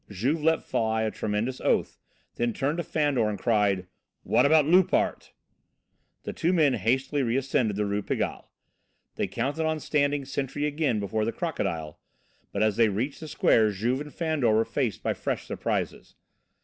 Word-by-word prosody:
Juve 125 - -1
let 160 +1 +2
fly 110 0 0
a 110 - -1
tremendous 110 +5 -2
oath, - - 0 0.3
then 120 -1 -1
turned 145 +7 -1
to 175 - -1
Fandor 145 -8 +1
and 105 - -3
cried: 100 -4 +1 0.4
"How - - +4
about 150 +1 +5
Loupart?" 180 +4 +2 0.9
The - - -5
two 170 - 0
men 155 -7 +3
hastily 130 +6 0
reascended 125 -3 0
the 105 +1 0
Rue 100 +1 -1
Pigalle. - - -3 0.6
They - - -2
counted 145 +4 -2
on 160 0 -1
standing 145 -2 0
sentry 140 +1 -3
again 145 -6 0
before 105 +2 -1
the 115 - 0
"Crocodile." 90 - -3 0.5
But 100 - 0
as 110 -2 +1
they 115 -2 +5
reached 120 +8 -2
the 160 - -8
square 110 -6 +3
Juve 115 +7 -1
and 150 0 -8
Fandor 155 -9 0
were 110 +1 +3
faced 125 -8 -2
by - - +1
fresh - - -3
surprises. - - -3
125 Hz, 165 wpm, -27 LUFS, 110-150 Hz, 0.9 s, about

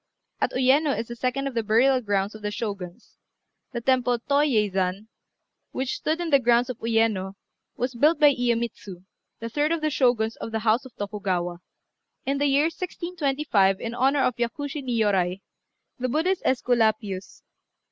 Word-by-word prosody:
At - - 0
Uyéno 270 +3 +3
is 230 - -4
the 235 - -6
second 255 +3 -2
of 275 - -3
the 230 - 0
burial 245 +5 +3
grounds 205 -2 -1
of 215 - -11
the 210 - -2
Shoguns. 200 -5 -6 0.5
The 235 - -4
Temple 250 -1 +2
Tô 280 +4 +1
yei 225 -8 +2
zan, 190 +2 -2 0.6
which 260 0 -2
stood 315 +2 -1
in 340 -2 -3
the 280 - +6
grounds 240 0 +2
of 245 - -10
Uyéno, 225 -4 0 0.4
was 250 +1 -2
built 300 +8 +3
by 295 -1 +6
Iyémitsu, 235 -7 -2 0.4
the 230 - -5
third 295 +6 0
of 335 -1 0
the 310 0 0
Shoguns 240 -5 +1
of - - -6
the 220 0 -2
house 225 +4 +3
of 260 - -13
Tokugawa, 185 -4 -3 0.7
in 275 +1 0
the 290 - +2
year 280 +1 +3
1625, 300 - 0
in 230 - -4
honour 270 +3 +2
of 250 - 0
Yakushi 280 +4 -3
Niôrai, 200 -7 0 0.6
the 255 0 -1
Buddhist 335 +8 0
Æsculapius. 220 -6 0
240 Hz, 165 wpm, -25 LUFS, 210-275 Hz, 0.7 s, the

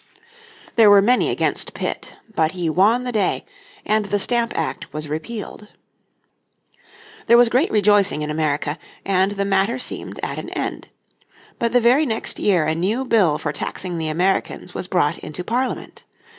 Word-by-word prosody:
There 220 -2 +7
were 205 0 +8
many 250 +4 +3
against - - -1
Pitt, - - -4 0.2
but 160 -3 +1
he 175 -3 -1
won 215 +9 +3
the 250 - -3
day, 210 -5 0 0.4
and 215 0 +1
the 205 +1 0
Stamp 235 +3 +1
Act 160 - -3
was 155 0 -6
repealed. 210 +7 -6 1.6
There 235 - +7
was 240 -1 +6
great 255 +8 +2
rejoicing 205 -6 +3
in 150 - -3
America, 150 0 -1 0.3
and 190 +1 +2
the 200 -1 -2
matter 195 +5 +1
seemed 255 - -5
at - - -3
an - - -7
end. - - -4 0.7
But 235 -1 0
the 245 - +4
very 255 +6 +4
next 220 -2 -2
year 180 -6 +2
a 155 - +1
new 205 +11 -1
bill 190 -11 +3
for - - -3
taxing 180 -3 -4
the 160 - -2
Americans 180 +2 -1
was - - -4
brought 170 -4 +1
into 180 +4 -7
Parliament. 245 +7 -3
200 Hz, 165 wpm, -21 LUFS, 165-230 Hz, 1.6 s, were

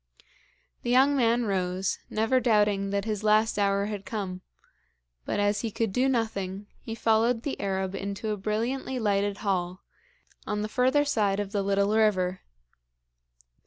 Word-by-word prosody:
The 240 - -4
young 265 +3 +5
man 240 -2 +2
rose, 185 -1 -1
never 225 +4 +2
doubting 210 -4 +2
that 200 0 -1
his 215 -2 -3
last 215 0 +3
hour 200 0 +2
had 205 -2 -5
come; 200 -7 -5 0.8
but - - -2
as 205 0 +1
he 230 - -2
could 220 -1 -2
do 260 +4 +2
nothing, 205 -5 -2 0.2
he 225 - -6
followed 230 +1 +2
the 280 - -4
Arab 190 -1 -2
into 200 +2 -4
a 210 - -2
brilliantly 230 +6 -2
lighted 205 -3 0
hall, 185 -1 -1 0.6
on 210 0 -1
the - - -2
further 260 +5 +2
side 205 -8 +1
of 200 -1 -3
the 205 - 0
little 200 +1 +1
river. 190 -4 +2
210 Hz, 155 wpm, -27 LUFS, 195-230 Hz, 0.8 s, young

